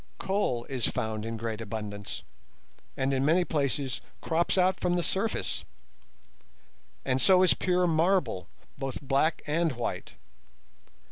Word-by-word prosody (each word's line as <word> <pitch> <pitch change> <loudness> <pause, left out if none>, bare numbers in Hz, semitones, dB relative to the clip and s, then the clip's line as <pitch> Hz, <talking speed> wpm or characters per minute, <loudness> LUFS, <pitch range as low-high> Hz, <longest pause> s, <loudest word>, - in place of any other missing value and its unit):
Coal 190 - 0
is 130 -4 -1
found 110 0 -2
in 115 0 -3
great 115 -1 -3
abundance, 105 -2 -5 0.7
and 135 +1 +1
in 135 0 +1
many 170 +5 +4
places 140 -4 -1 0.2
crops 170 +3 +1
out 185 +1 +3
from 175 0 +1
the 175 - +1
surface; 210 +6 -1 1.4
and 130 -1 +1
so 185 -1 +6
is 185 - +6
pure 180 -1 +1
marble, 160 - +2 0.3
both 135 -2 -3
black 140 +3 +1
and 160 0 +1
white. 120 -1 -4
140 Hz, 130 wpm, -29 LUFS, 115-175 Hz, 1.4 s, so